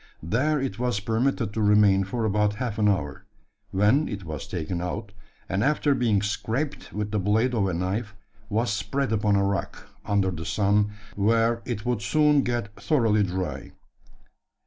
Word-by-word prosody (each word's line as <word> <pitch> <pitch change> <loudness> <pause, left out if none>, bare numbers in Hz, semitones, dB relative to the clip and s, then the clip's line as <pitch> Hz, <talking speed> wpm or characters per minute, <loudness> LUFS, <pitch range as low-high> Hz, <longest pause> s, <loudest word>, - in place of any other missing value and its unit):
There 140 - +1
it 125 -6 -3
was 125 -4 0
permitted 115 +1 0
to 110 - -1
remain 105 -2 +4
for 115 +4 -2
about 105 0 +1
half 110 -2 -3
an 105 -1 +4
hour, 80 -3 -2 0.5
when 105 +10 +2
it 100 -3 -5
was 80 -2 -6
taken 85 0 -3
out; 100 +4 -4 0.4
and, 95 +2 0
after 150 0 +2
being 115 -6 +1
scraped 120 +8 -3
with 105 0 -3
the 105 - 0
blade 110 +6 +1
of 105 -5 +1
a 95 - -1
knife, 100 +5 -2 0.3
was 110 +1 0
spread 135 +3 -1
upon 105 -1 +2
a 100 - +3
rock, 100 0 -3 0.2
under 100 -2 +1
the 80 -2 -6
sun, 105 +3 +1 0.2
where 115 +3 +2
it 115 -5 -4
would 120 -3 0
soon 150 +7 +3
get 120 -5 -2
thoroughly 110 0 +2
dry. 95 -1 -3
105 Hz, 170 wpm, -25 LUFS, 100-120 Hz, 0.5 s, remain